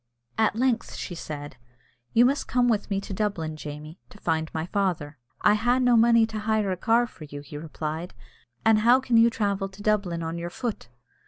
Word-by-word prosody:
At 220 -1 +2
length 240 0 0
she 180 - -5
said, 145 -5 -7 0.5
"You 235 +2 +5
must 275 +3 +1
come 245 -1 +2
with 220 -3 0
me 195 -1 0
to 200 - -7
Dublin, 185 -6 -2
Jamie, 150 +2 -8
to - - -15
find 160 -4 -1
my 160 0 -3
father." 175 -7 -2 0.2
"I - - +5
ha' 240 +4 +2
no 250 -1 +4
money 230 0 +5
to 220 -1 -5
hire 215 -2 0
a - - 0
car 230 +5 +2
for 165 -9 -12
you," 145 -1 -8
he 145 +1 -11
replied, 155 +2 -5 0.5
"an' 225 -1 +6
how 240 +4 +5
can 260 -3 0
you 230 +1 +7
travel 200 -3 -1
to 195 +2 -12
Dublin 200 -6 0
on 165 +1 -4
your 170 0 -4
foot?" 225 - -4
200 Hz, 200 wpm, -26 LUFS, 160-230 Hz, 0.5 s, you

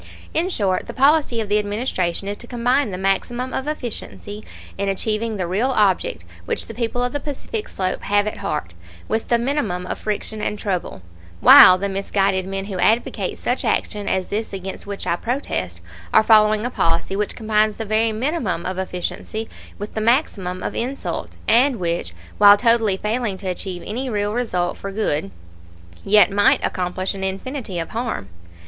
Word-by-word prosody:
In 340 +3 +1
short, 195 - 0
the 235 - -7
policy 280 -3 +3
of 215 - -4
the 210 +1 +2
Administration 205 -4 -2
is 205 - -2
to 240 - -10
combine 245 +2 +1
the 185 - -4
maximum 240 +7 -1
of 265 - -3
efficiency 220 -6 -6 0.3
in 200 0 -1
achieving 215 +3 -1
the 185 - -1
real 200 +9 0
object 200 - +1 0.2
which - - -1
the 225 - -8
people 235 +1 -1
of 245 - -2
the 290 - -1
Pacific 305 - -5
Slope 185 -1 -2
have 205 0 +2
at 215 - -3
heart, 150 - -3 0.3
with 220 +1 -1
the 235 - +4
minimum 235 -8 -1
of - - -4
friction 215 0 -3
and 210 - -2
trouble, 185 - -3 0.4
while 185 - +10
the 200 +2 -2
misguided 195 -1 0
men 195 0 -3
who 195 -3 -5
advocate 220 +6 +1
such - - -1
action 205 -2 -1
as 190 -1 0
this 220 +1 -3
against 190 +1 -6
which 200 -1 -5
I 170 - +1
protest 95 - -3 0.3
are - - +6
following 215 0 +5
a 245 - -2
policy 165 -1 0
which 205 +1 -1
combines 215 -1 +1
the 225 - -5
very 220 +2 +2
minimum 230 - -1
of 185 0 -3
efficiency 190 +4 -4 0.3
with 205 +1 -7
the 220 - -2
maximum 210 - +1
of - - -3
insult, 260 +4 -4
and 250 +4 +4
which, 170 - -2 0.2
while 205 0 +9
totally 225 -3 +3
failing 215 -1 -1
to 190 0 -7
achieve 180 0 -4
any 255 +5 -3
real 205 -2 -1
result 180 -8 -1
for 195 - -6
good, 155 - -1 0.7
yet 210 0 +5
might 205 +1 +4
accomplish 185 +1 -2
an 195 -1 -6
infinity 195 +2 -4
of 165 -1 -3
harm. 230 - -3
210 Hz, 180 wpm, -21 LUFS, 190-235 Hz, 0.7 s, while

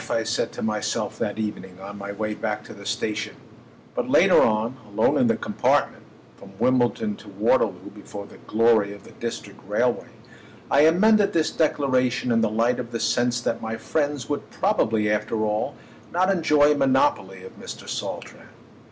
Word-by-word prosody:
I 115 - +1
said 110 +2 -1
to - - -6
myself 110 0 -2
that 105 -2 -2
evening 95 -4 -5
on 100 +1 -9
my 100 0 -5
way 105 +1 -3
back 105 0 -3
to - - -11
the 100 -1 -10
station; 105 +1 -2 0.6
but - - -2
later - - +6
on, 110 +4 +1
alone 105 - +2
in - - +4
the - - +3
compartment - - 0 0.4
(from 95 - -14
Wimbledon 120 -3 +1
to 105 +1 -13
Waterloo, 100 -2 0
before 100 -1 -9
the - - -15
glory 110 -2 +3
of 100 - -15
the - - -14
District 115 0 -6
Railway) - - 0 0.6
I 145 +3 +6
amended 205 +5 +4
this 160 -2 +1
declaration 130 -5 +1
in 115 -1 +3
the 110 - +2
light 115 +3 +1
of 120 -2 -5
the 115 -1 -4
sense 120 0 +1
that 115 - -2
my 110 0 -4
friends 145 +2 -2
would 145 - -4
probably 110 - +1
after 105 +1 0
all 105 0 -1 0.4
not 185 +2 +2
enjoy 150 -5 +4
a - - +3
monopoly 115 -9 +1
of 95 - -12
Mr. - - -9
Saltram. - - -6
115 Hz, 175 wpm, -24 LUFS, 105-130 Hz, 0.6 s, later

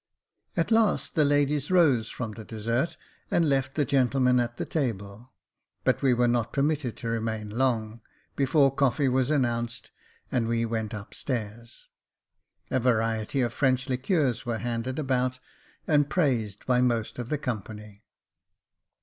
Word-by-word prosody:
At - - 0
last 225 -2 +2
the 155 - +3
ladies 145 0 +2
rose 145 -11 +4
from 115 -3 -5
the 110 +1 -9
dessert, 115 +7 -2 0.3
and 170 -2 +2
left 135 -2 0
the 145 - +2
gentlemen 130 -2 +3
at 120 0 -2
the - - -3
table: 115 - -3 0.5
but - - +1
we 135 - +3
were 120 0 +3
not 120 -1 0
permitted 140 -5 0
to 115 - -6
remain 110 -2 -2
long, 115 -2 -1 0.3
before 135 0 +3
coffee 135 0 +2
was 130 0 +1
announced, 120 -5 -1 0.4
and 115 -2 +1
we 115 0 +1
went 110 -1 -3
up 105 0 -9
stairs. 115 -2 -5 0.8
A 130 - +2
variety 115 +1 +1
of 120 -1 -1
French 130 0 +1
liqueurs 130 - 0
were 120 -3 -2
handed 120 +3 -3
about, 130 -3 0 0.5
and 145 -2 +3
praised 120 - 0
by 125 -1 +3
most 120 -2 0
of 120 -1 -5
the 150 - 0
company. 105 -5 -6
125 Hz, 150 wpm, -27 LUFS, 115-135 Hz, 0.8 s, rose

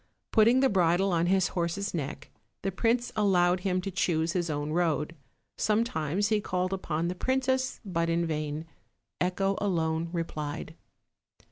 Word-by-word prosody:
Putting 230 +3 +5
the 270 - +5
bridle 185 +1 +3
on 170 0 +2
his 190 0 +3
horse's 175 +3 -2
neck, 145 -3 -5 0.3
the 195 - 0
prince 235 +5 +1
allowed 180 -3 +3
him 185 -1 0
to 195 - -4
choose 170 -3 +1
his 175 -3 -1
own 145 0 -2
road: 165 -1 0 0.4
sometimes 205 - +1
he 215 -1 +2
called 185 -1 -1
upon 170 -3 -2
the 180 - -1
princess, 260 +5 0
but 170 -3 -1
in 170 0 +1
vain. 155 -1 -3 0.5
Echo 195 +2 0
alone 165 -4 0
replied. 155 -2 -4
180 Hz, 145 wpm, -29 LUFS, 165-200 Hz, 0.5 s, Putting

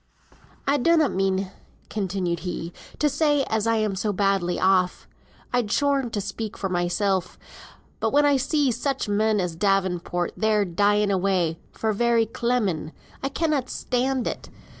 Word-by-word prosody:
"I 280 +1 +3
donnot 320 0 +3
mean," 190 0 0 0.4
continued 185 -4 -2
he, 175 -1 -5 0.2
"to 300 - +2
say 290 0 +2
as 220 -3 -1
I'm 215 -3 +1
so 205 +2 -1
badly 195 -3 +1
off. 185 -1 +2 0.5
I'd 245 -4 +1
scorn 280 -2 +1
to 215 - -3
speak 205 +2 -5
for 195 - -2
mysel; 180 +2 +1 0.8
but - - +1
when 290 +1 +4
I 285 -1 +4
see 280 +1 +1
such 265 +2 -2
men 210 +1 +2
as 180 -3 -2
Davenport 180 -2 0
there 215 -2 +2
dying 205 +3 +2
away, 185 -4 +1
for 220 -1 -1
very 235 +1 +2
clemming, 220 -9 -1 0.3
I 275 - -1
cannot 290 -3 0
stand 255 0 -1
it. - - -4
210 Hz, 145 wpm, -24 LUFS, 190-250 Hz, 0.8 s, when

